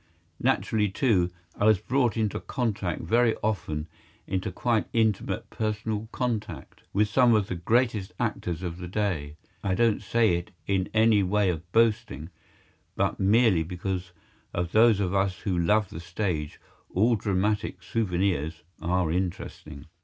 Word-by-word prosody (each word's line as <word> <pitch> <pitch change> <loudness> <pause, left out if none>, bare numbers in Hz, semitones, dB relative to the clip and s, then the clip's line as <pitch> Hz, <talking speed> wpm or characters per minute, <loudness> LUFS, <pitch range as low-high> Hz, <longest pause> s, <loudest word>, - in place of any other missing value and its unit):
Naturally, 105 -2 +1
too, 100 - +2 0.3
I 105 - 0
was 110 -1 +6
brought 125 +3 0
into 110 -2 0
contact, 110 - -2
very 115 +6 +3
often 85 -8 -2 0.4
into 95 +1 -2
quite 115 +4 0
intimate 110 -3 0
personal 110 0 -2
contact, 120 -4 -4
with 105 +2 +2
some 120 +1 +4
of 105 -2 +2
the 95 - -4
greatest 110 +2 +1
actors 95 -7 -2
of 85 -1 -4
the 90 - -6
day. 90 -7 -2 0.3
I 95 -2 +1
don't 115 +1 +2
say 110 -3 +2
it 85 - -7 0.2
in 95 -1 0
any 110 -1 +4
way 100 0 +2
of 85 +1 -7
boasting, 115 -7 +1 0.6
but - - 0
merely 105 -2 +4
because 90 +1 -4 0.4
to 85 - +1
those 110 +4 +4
of 95 -2 0
us 95 -1 +1
who 95 -4 -1
love 95 +4 +2
the 80 - -7
stage 85 -3 -3 0.3
all 115 +6 +3
dramatic 100 -2 -1
souvenirs 90 -6 -1 0.2
are 90 -1 +1
interesting. 80 -5 -4
100 Hz, 145 wpm, -27 LUFS, 90-110 Hz, 0.6 s, was